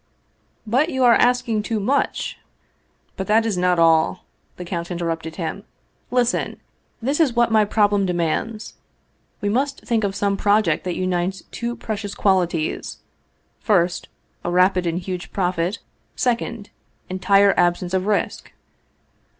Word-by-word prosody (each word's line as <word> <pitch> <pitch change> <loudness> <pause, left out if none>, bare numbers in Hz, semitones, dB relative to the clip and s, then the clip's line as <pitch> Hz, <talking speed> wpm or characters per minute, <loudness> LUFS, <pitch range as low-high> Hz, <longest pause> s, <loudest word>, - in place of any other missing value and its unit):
" - - -42 0.2
But 260 +9 +2
you 260 -5 0
are 240 -1 +7
asking 245 -3 +2
too 220 +1 -2
much." 265 +8 -1 0.4
" - - -42
But 190 - -4
that 225 +2 +3
is 220 -4 0
not 180 0 +2
all," 165 +1 +3 0.3
the 180 - -7
count 170 -1 -4
interrupted 165 -2 -3
him; 185 +3 -4 0.2
" - - -43
lis 245 -1 +4
ten! - - -3 0.5
This 275 +6 0
is 280 -7 +3
what 235 -1 +3
my 215 -1 +4
problem 205 -2 +2
demands. 180 +6 -2 0.7
We 205 - 0
must 270 +5 -1
think 225 -2 0
of 195 -1 -1
some 200 -1 0
project 205 -6 +2
that 180 - -2
unites 185 +1 -1
two 235 0 -4
precious 210 -3 -5
qualities: 175 -5 0 0.6
first, 180 -5 +1 0.3
a - - -2
rapid 180 0 +3
and 165 0 -1
huge 180 0 -5
profit; 180 0 -1 0.4
second, 235 -4 -2 0.4
entire 195 +1 +3
absence 175 +1 +1
of 190 +1 0
risk." 210 -1 -1
200 Hz, 150 wpm, -22 LUFS, 180-225 Hz, 0.7 s, are